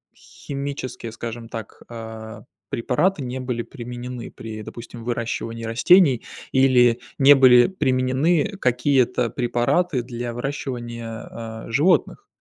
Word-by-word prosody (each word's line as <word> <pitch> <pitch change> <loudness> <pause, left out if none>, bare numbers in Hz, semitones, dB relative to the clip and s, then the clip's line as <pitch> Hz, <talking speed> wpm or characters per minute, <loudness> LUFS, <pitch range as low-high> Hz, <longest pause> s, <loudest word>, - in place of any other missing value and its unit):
химические, 140 -4 -6
скажем 115 +1 -7
так, 110 -3 -8
а, 110 -1 -8 0.3
препараты 140 +9 0
не 125 +1 -4
были 125 -2 -3
применены 125 -1 -7
при, 110 -1 -8
допустим, 115 +1 -9
выращивании 115 -1 -3
растений, 130 +3 +5 0.3
или 125 -3 +5 0.2
не 140 +1 +8
были 125 -2 +7
применены 150 +4 +1
какие-то 125 -1 +2
препараты 125 +4 0
для 120 -1 -5
выращивания, 120 -3 -5 0.2
а, 110 -1 -8
животных. 150 +10 +2
125 Hz, 105 wpm, -23 LUFS, 115-135 Hz, 0.3 s, не